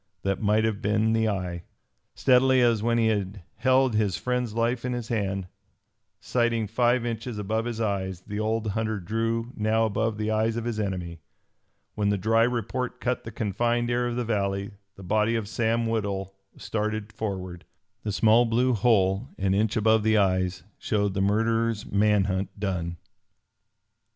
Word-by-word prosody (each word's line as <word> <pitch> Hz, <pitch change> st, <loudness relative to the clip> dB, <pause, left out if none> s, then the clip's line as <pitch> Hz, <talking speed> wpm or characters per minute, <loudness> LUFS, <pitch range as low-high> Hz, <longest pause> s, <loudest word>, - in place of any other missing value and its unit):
That 100 Hz, 0 st, -1 dB
might 105 Hz, +1 st, +3 dB
have 110 Hz, -2 st, -1 dB
been 110 Hz, +2 st, +2 dB
the 110 Hz, -1 st, +2 dB
eye. 90 Hz, -4 st, -3 dB, 0.5 s
Steadily 130 Hz, 0 st, +4 dB
as 115 Hz, -3 st, +3 dB
when 115 Hz, +1 st, +1 dB
he 115 Hz, -, +3 dB
had 100 Hz, -3 st, -2 dB
held 130 Hz, -1 st, +3 dB
his 105 Hz, -4 st, +1 dB
friend's 125 Hz, -3 st, -2 dB
life 115 Hz, +1 st, 0 dB
in 125 Hz, 0 st, -2 dB
his 120 Hz, -2 st, -5 dB
hand, 95 Hz, -4 st, -1 dB, 0.7 s
sighting 120 Hz, -2 st, 0 dB
five 120 Hz, +3 st, +1 dB
inches 115 Hz, 0 st, -4 dB
above 110 Hz, +2 st, -1 dB
his 120 Hz, -2 st, -4 dB
eyes, 95 Hz, -4 st, -2 dB
the 105 Hz, +3 st, -6 dB
old 110 Hz, +1 st, -1 dB
hunter 110 Hz, 0 st, -1 dB
drew 115 Hz, +5 st, -2 dB
now 110 Hz, +1 st, +2 dB
above 110 Hz, 0 st, -1 dB
the 110 Hz, 0 st, -1 dB
eyes 110 Hz, +1 st, +1 dB
of 115 Hz, -, -2 dB
his 115 Hz, -2 st, -2 dB
enemy. 90 Hz, -5 st, -4 dB, 0.7 s
When 105 Hz, -1 st, 0 dB
the 100 Hz, -, +1 dB
dry 115 Hz, +4 st, +2 dB
report 125 Hz, +2 st, -1 dB
cut 125 Hz, 0 st, -2 dB
the 115 Hz, -, -6 dB
confined 120 Hz, +3 st, 0 dB
air 120 Hz, 0 st, +1 dB
of 120 Hz, -, -3 dB
the 125 Hz, -1 st, -1 dB
valley, 100 Hz, -2 st, -1 dB, 0.2 s
the 95 Hz, -, -12 dB
body 110 Hz, +4 st, +1 dB
of 110 Hz, -3 st, -2 dB
Sam 115 Hz, +1 st, 0 dB
Woodhull 100 Hz, -4 st, -2 dB, 0.2 s
started 110 Hz, 0 st, -3 dB
forward. 95 Hz, -5 st, -5 dB, 0.4 s
The 105 Hz, -, -3 dB
small 110 Hz, +4 st, +4 dB
blue 125 Hz, +3 st, +2 dB
hole 105 Hz, 0 st, +2 dB
an 95 Hz, -1 st, +1 dB
inch 105 Hz, +2 st, +1 dB
above 110 Hz, 0 st, +4 dB
the 110 Hz, +1 st, +3 dB
eyes 95 Hz, -2 st, +1 dB, 0.2 s
showed 100 Hz, -2 st, 0 dB
the 95 Hz, -, -1 dB
murderer's 115 Hz, +2 st, +1 dB
man 105 Hz, 0 st, +3 dB
hunt 95 Hz, +1 st, -3 dB
done. 90 Hz, -4 st, -2 dB
110 Hz, 170 wpm, -26 LUFS, 100-115 Hz, 0.7 s, Steadily